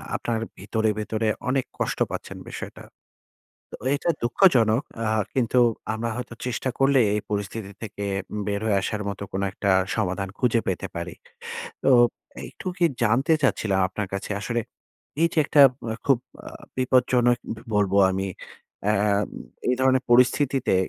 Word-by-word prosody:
আপনার 115 -2 -1 0.2
ভিতরে, 110 +3 -1
ভিতরে 110 +1 -1 0.2
অনেক 130 0 +1
কষ্ট - - -1
পাচ্ছেন - - -6
বিষয়টা। - - -8 0.9
তো, - - -6 0.2
এটা 160 +4 0
দুঃখজনক। 120 - +4 0.2
আ - - -1 0.3
কিন্তু 125 -1 +2 0.3
আমরা 115 +1 -2
হয়তো 125 -1 -6
চেষ্টা 125 +1 -2
করলেই 135 -4 +4
এই 105 - 0
পরিস্থিতি 100 0 -3
থেকে 100 -2 -5 0.3
উম 105 - -3
বের 100 0 -1
হয়ে 105 -3 +2
আসার 105 0 -2
মত 100 -1 -5
কোন 95 +1 -2
একটা 100 0 -1 0.3
সমাধান 95 -2 -1
খুঁজে 120 -2 +2
পেতে - - -2
পারি। - - -5 0.7
তো, - - +4 0.6
একটু - - -13
কি 175 - +3 0.2
জানতে 130 +8 +3
চাচ্ছিলাম 105 -7 +1
আপনার 105 +1 -4
কাছে 100 - -4
আসলে, 120 +2 -1 0.6
এই 170 - +5
যে - - -1
একটা 145 0 +4 0.3
আ - - -3
খুব 135 -4 +4 0.3
আ - - -10 0.3
বিপজ্জনক 125 -1 +3 0.2
ব - - -12 0.2
বলব 100 -2 +2 0.2
আমি, 95 +1 -2 0.6
আম 105 -1 +2 0.4
এই 125 - +4
ধরনের 130 0 +3
পরিস্থিতিতে 125 0 +3
115 Hz, 150 wpm, -24 LUFS, 105-130 Hz, 0.9 s, এই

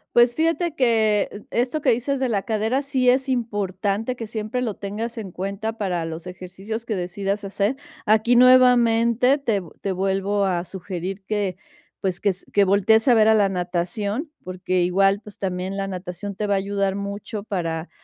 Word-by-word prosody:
Pues, 240 0 +5
fíjate 330 +1 0
que, 220 -6 +2
esto 250 +6 -1
que - - +2
dices 255 +4 +1
de 260 -1 0
la 200 -4 0
cadera, 225 +4 0
sí 265 -3 +2
es 265 +2 +2
importante 205 -1 -1
que 230 -2 -6
siempre 220 +3 -3
lo 225 -5 -2
tengas 220 +4 -5
en 205 -5 -6
cuenta 200 +5 -4
para 180 -5 -1
los 165 +2 -7
ejercicios 190 +5 -7
que 220 - -2
decidas 195 +3 -3
hacer. 200 +5 -1 0.3
Aquí, 220 +3 +4
nuevamente, 250 0 +5
te 225 -7 0
vu 170 - -13
te 195 - -1
vuelvo 195 +2 0
a 180 -2 -1
sugerir 190 +1 -6
que, 200 -3 -2 0.4
pues, 185 -2 -2
que 205 - +3
s 185 -1 -4
que 205 - +5
voltees 205 +4 +3
a 245 - +6
ver 220 -1 +5
a 220 - +6
la 205 -2 +3
natación, 195 - -2
porque 185 0 -1
igual, 195 +3 +3
pues, 210 -1 -13
también 185 0 -3
la 195 0 -2
natación 190 +1 -6
te 210 - -2
va 205 - +1
a - - +2
ayudar 195 0 -1
mucho 200 +1 -5
para 170 -5 -3
205 Hz, 185 wpm, -23 LUFS, 190-230 Hz, 0.4 s, a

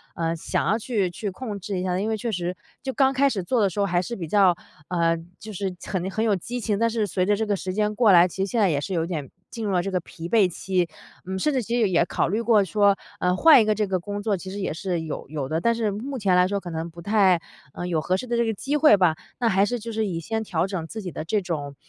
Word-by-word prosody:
呃 165 0 -1
想 165 - -2
要 220 +3 +2
去 205 -6 -1
去 205 +3 -4
控 205 0 -6
制 190 0 -4
一 - - -2
下。 180 0 0
因 215 +2 -1
为 220 - 0
确 230 +2 -3
实， 180 -1 -2 0.3
就 265 - -3
刚 270 0 +3
开 275 +1 +3
始 195 -7 -2
做 240 +4 +1
的 200 - +3
时 195 - -6
候 200 - +3
还 175 -2 +1
是 235 +6 -5
比 170 -6 -5
较 190 -1 +4 0.3
嗯 165 -1 0 0.2
就 220 - -7
是 195 -2 -3
很 190 -1 -2
很 220 +3 -1
有 215 -3 +3
激 245 +8 -5
情， 210 -2 -1
但 230 - +3
是 220 -2 0
随 185 -1 0
着 205 +1 +3
这 220 +1 -1
个 210 - 0
时 185 +1 -4
间 210 +1 0
过 220 -3 +5
来， 175 0 +7
其 - - -11
实 - - -7
现 235 -3 +1
在 195 - +4
也 145 -3 +1
是 185 +6 -4
有 165 -1 0
点 155 -7 -4 0.2
进 225 -2 -5
入 200 - -1
了 180 - +3
这 195 - -3
个 180 - +1
疲 170 0 -9
惫 205 -5 +4
期， 180 0 -1 0.4
嗯， 190 +1 -3
甚 300 +9 +1
至 260 - +1
其 235 +2 -2
实 210 - +3
也 170 -1 +3
考 165 - 0
虑 215 +4 0
过 225 -3 +4
说， 200 +2 +3 0.2
呃 180 0 +2
换 300 0 +7
一 - - +2
个 215 0 +2
这 210 0 +1
个 190 -2 -1
工 205 +3 -5
作 205 -3 +1
其 185 +2 -8
实 200 +2 -6
也 190 - -2
是 175 0 -2
有 155 -2 -6
有 145 -4 -4
的。 160 +1 0
但 235 +6 +2
是 220 -3 0
目 260 +7 -5
前 195 -5 +1
来 180 0 +5
说， 200 0 -2
可 175 - -7
能 165 +1 -4
不 170 +1 -12
太， 190 -3 +3 0.3
呃 175 - -5
有 170 -3 0
合 180 +5 0
适 190 - -3
的 240 -1 -1
这 235 - +2
个 225 - 0
机 275 +8 -1
会 295 -8 +7
吧， 180 -5 +3 0.3
那 230 - +3
还 195 +1 +3
是 245 +3 -2
就 230 +1 -6
是 220 0 -1
以 170 -3 -3
先 220 +6 -2
调 170 -3 0
整 185 -4 -4
自 220 - -6
己 180 -4 -5
的 155 - -6
这 205 +4 0
种 145 -5 -4
195 Hz, 325 characters per minute, -24 LUFS, 175-220 Hz, 0.4 s, 来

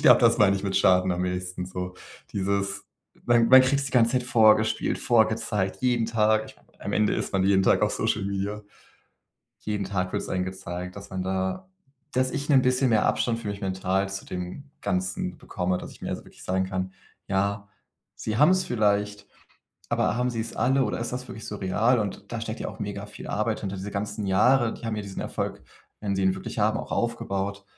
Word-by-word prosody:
ich - - -9
glaube, - - +7
das - - +5
meine 100 -2 +5
ich 95 - -5
mit 95 -1 -1
Schaden 95 -1 +4
am 90 +1 -1
ehesten 90 0 -3
so. 90 0 -5 0.4
Dieses 100 0 -1 0.4
man 120 -1 +4
man 130 0 +9
kriegt's 140 +2 +1
die 135 - -5
ganze 115 -1 +4
Zeit 125 - +2
vorgespielt, 110 -2 +3
vorgezeigt, 110 -4 +1
jeden 120 -2 +2
Tag, 110 -1 +2
ich - - -14
meine, - - -28 0.2
am - - -3
Ende 105 0 +2
ist - - -3
man 95 -1 +2
jeden 95 0 +4
Tag - - +4
auf - - +2
Social 100 -2 0
Media. 100 +1 -2 1.0
Jeden 105 -1 -2
Tag 95 -2 -2
wird - - -1
es - - -7
einem 90 0 0
gezeigt, 90 0 -6
dass 100 0 -9
man 95 -1 -3
da 95 0 -2 0.4
dass 130 0 +1
ich 140 0 -4
'nen 135 -3 +5
bisschen 130 0 +2
mehr 110 -2 +3
Abstand 115 -1 +1
für 110 - -5
mich 100 0 -4
mental 95 0 0
zu 95 0 -5
dem 90 +9 -6 0.2
Ganzen 90 -1 -2
bekomme, 90 0 -2
dass - - -8
ich - - -15
mir - - -3
also - - -5
wirklich - - -15
sagen 95 +1 0
kann: 95 0 -3 0.4
„Ja, 100 +1 0 0.5
sie 110 - -3
haben's 185 +6 +5
vielleicht, 105 -3 0 0.6
aber - - +1
haben 125 +1 +1
sie's 115 -1 -4
alle, 135 +1 +3
oder - - -2
ist 115 - -3
das 125 0 -4
wirklich 110 - -8
so 105 - -5
real?“ 105 +6 +2
Und 100 -3 -5
da 115 - -3
steckt 115 0 -5
ja - - -3
auch - - -10
mega 100 0 -4
viel 105 - -10
Arbeit 110 +1 -1
hinter, 100 -1 -3
diese 95 +2 -5
ganzen 105 +1 -3
Jahre. 120 +5 +4
Die - - -8
haben 110 - -1
ja 105 - -3
diesen 100 -1 -6
Erfolg, - - -4 0.4
wenn 100 -2 -1
sie 95 - 0
ihn 95 0 +3
wirklich 95 - -7
haben, 110 +1 +2
auch - - -6
aufgebaut. 100 -4 -2
100 Hz, 215 wpm, -26 LUFS, 95-115 Hz, 1.0 s, man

